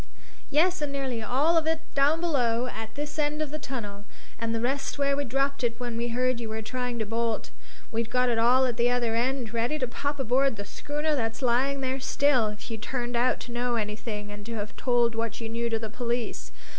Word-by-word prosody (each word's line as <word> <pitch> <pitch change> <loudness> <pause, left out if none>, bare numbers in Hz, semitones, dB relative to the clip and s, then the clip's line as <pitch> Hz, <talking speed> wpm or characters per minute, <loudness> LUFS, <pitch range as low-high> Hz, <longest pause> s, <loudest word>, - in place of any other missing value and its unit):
"Yes, 345 +4 +3
and 295 -1 -1
nearly 265 -4 -2
all 280 +10 +3
of 320 - -4
it 320 0 +1
down 290 +4 +4
below, 250 -8 +2
at 225 -3 -6
this 295 +2 -4
end 300 0 +1
of 305 -2 -2
the 305 - -3
tunnel, 210 -8 -5 0.4
and 230 0 -1
the - - 0
rest 270 +5 -1
where 280 0 +2
we 285 - 0
dropped 275 +2 0
it 230 -1 0
when 240 -2 -3
we 235 +1 -1
heard 250 +1 +1
you 230 -2 -4
were 220 0 -3
trying 250 +1 -2
to 220 - -1
bolt. 230 +1 -1 0.4
We'd 230 0 -1
got 250 0 +3
it 235 -2 +2
all 250 +3 +5
at 240 -3 -1
the 240 0 +4
other 245 -2 +1
end, 240 0 0
ready 235 +6 +1
to 255 - 0
pop 285 +4 -2
aboard 265 +1 +3
the 200 -1 -6
schooner 295 +8 -1
that's 225 -1 -2
lying 265 +3 +2
there 260 0 -1
still, 265 -3 +3
if 210 +2 -6
you 225 - -3
turned 240 +2 -2
out 245 +2 +3
to 245 - -7
know 240 0 0
anything 210 -1 -3
and 205 0 -8
to 230 - -4
have 205 -1 -4
told 240 -2 +2
what 225 -1 -2
you 230 - -4
knew 235 +1 -1
to 225 - +1
the 220 0 -4
police. 240 0 -2
245 Hz, 230 wpm, -28 LUFS, 230-275 Hz, 0.4 s, all